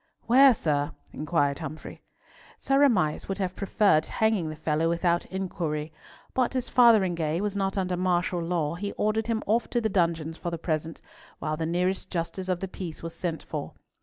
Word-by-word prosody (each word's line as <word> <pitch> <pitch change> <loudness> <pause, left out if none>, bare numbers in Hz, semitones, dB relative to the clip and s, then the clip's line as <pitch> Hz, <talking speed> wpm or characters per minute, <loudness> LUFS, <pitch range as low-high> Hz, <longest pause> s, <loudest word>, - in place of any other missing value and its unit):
"Where, 260 +1 +7
sir?" 145 -6 -1 0.2
inquired 150 -2 0
Humfrey. 155 -1 -8 0.6
Sir 275 0 +1
Amias 180 - +2
would 195 - -3
have 185 -2 -2
preferred 195 -5 +2
hanging 220 -7 +1
the 155 - -6
fellow 160 +1 0
without 170 0 +1
inquiry, 160 -5 -3 0.4
but 255 0 +1
as 255 - -1
Fotheringhay 185 -10 +4
was 205 0 -2
not 195 0 -1
under 185 -1 0
martial 180 -1 0
law, 165 -3 -1
he 200 +4 -4
ordered 215 +1 0
him 225 -2 -1
off 225 +3 +1
to 240 - +1
the 220 -2 0
dungeons 165 -4 0
for 175 - -3
the 170 - -4
present, 160 0 -3 0.4
while 155 - -2
the 160 +1 -2
nearest 180 +3 -1
justice 185 +2 -3
of 180 -1 0
the 190 - -2
peace 180 -4 -7
was 165 0 -5
sent 165 -1 -3
for. 150 -3 -5
175 Hz, 180 wpm, -27 LUFS, 160-200 Hz, 0.6 s, Where